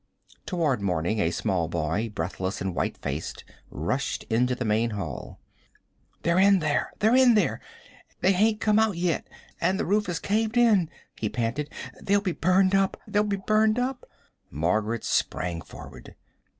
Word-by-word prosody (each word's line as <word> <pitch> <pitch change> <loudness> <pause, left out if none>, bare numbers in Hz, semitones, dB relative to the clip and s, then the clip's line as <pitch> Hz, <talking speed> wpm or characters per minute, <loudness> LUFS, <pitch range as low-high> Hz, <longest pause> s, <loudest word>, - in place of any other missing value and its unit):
Toward 155 - 0
morning 90 +2 0
a 85 - +2
small 85 -1 -1
boy, 85 +7 -1
breathless 95 -1 -3
and 95 -1 -3
white - - -2
faced, - - -5 0.3
rushed 85 - -2
into 125 +3 +2
the 125 - -4
main 110 +2 +1
hall. 95 - -6 0.8
"They're 170 +2 +2
in 200 0 +6
there 155 -4 0
they're 220 +4 +3
in 255 -3 +6
there 210 - +1 0.6
they 190 - +4
hain't 210 +3 +2
come 215 0 +3
out 220 -5 +2
yet 170 -1 -1 0.3
an' 185 +3 +1
the - - -1
roof 210 +2 +1
has 175 -2 -2
caved 220 +3 0
in!" 210 -9 +4 0.3
he 110 - -1
panted. 120 +7 -2 0.3
"They'll 200 +1 +2
be 200 -3 -2
burned 185 +3 +2
up 195 -1 +2
they'll 205 - +2
be 205 -1 -1
burned 215 +3 +2
up!" 250 +1 -2 0.4
Margaret 105 - -1
sprang 85 -2 -1
forward. - - -12
170 Hz, 160 wpm, -26 LUFS, -, 0.8 s, in